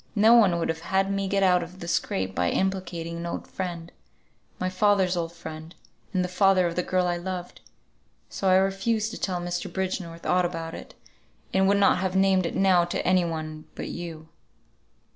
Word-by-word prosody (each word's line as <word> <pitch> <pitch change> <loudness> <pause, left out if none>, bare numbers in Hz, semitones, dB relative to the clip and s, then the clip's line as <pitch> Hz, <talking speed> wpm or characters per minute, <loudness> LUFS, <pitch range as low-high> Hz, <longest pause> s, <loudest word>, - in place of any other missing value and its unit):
No 220 +2 +6
one 205 -7 +5
would 165 - -1
have 165 0 -2
had 190 +3 0
me 195 0 -1
get 195 0 +1
out 180 -1 +4
of 175 +2 -9
the 170 - -7
scrape 95 - -1
by 90 -1 +1
implicating 175 - -2
an 170 0 -5
old - - -4
friend, 175 -3 -5 0.7
my 185 - -2
father's 190 -1 +2
old 165 -1 -2
friend, 160 -1 -9 0.4
and 185 -3 +1
the - - -1
father 185 0 +3
of 170 -1 -2
the 180 - +1
girl 185 0 0
I 175 -1 0
loved. 180 0 -6 0.7
So 195 - -1
I 185 - +6
refused 195 +4 +1
to - - -7
tell 180 -2 -1
Mr. 175 +1 -4
Bridgenorth 180 -2 -4
aught 180 0 +3
about 165 -2 -4
it, - - -10 0.6
and 190 0 +3
would 200 +1 +4
not 200 -2 +4
have 190 0 -2
named 190 -2 +3
it - - -5
now 185 -3 +4
to 175 - -3
any 185 0 +4
one 155 -2 -5
but - - -5
you." 165 -2 -7
180 Hz, 200 wpm, -26 LUFS, 170-190 Hz, 0.7 s, No